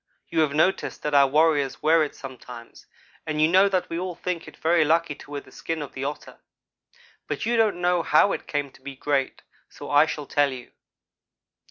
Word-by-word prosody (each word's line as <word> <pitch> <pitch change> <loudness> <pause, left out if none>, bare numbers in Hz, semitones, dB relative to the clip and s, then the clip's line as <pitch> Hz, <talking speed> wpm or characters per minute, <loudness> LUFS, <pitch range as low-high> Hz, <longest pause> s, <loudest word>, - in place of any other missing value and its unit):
You 165 - -1
have 150 -2 +2
noticed 170 +5 0
that 150 - -2
our 140 -1 +6
warriors 150 -1 +1
wear 160 +1 +4
it 150 - -5
sometimes 125 -3 -11 0.4
and 155 -1 -2
you 155 - +5
know 190 +4 +5
that 185 -2 0
we 165 - -4
all 180 -1 -4
think 180 -1 -4
it - - -13
very 165 0 +3
lucky 165 0 +1
to 145 - -15
wear 145 -1 -5
the 130 - -19
skin 165 +3 -4
of 140 - -10
the 135 0 -5
Otter. 145 +1 -7 0.9
But - - -3
you 235 - +1
don't 220 -5 +2
know 175 0 +2
how 165 +5 +4
it - - -5
came 145 -2 -2
to - - -20
be 135 0 -8
great; 135 0 -2 0.3
so - - -9
I 145 +2 +5
shall 150 -2 -5
tell 145 0 +1
you. 125 -2 -9
155 Hz, 210 wpm, -24 LUFS, 140-170 Hz, 0.9 s, our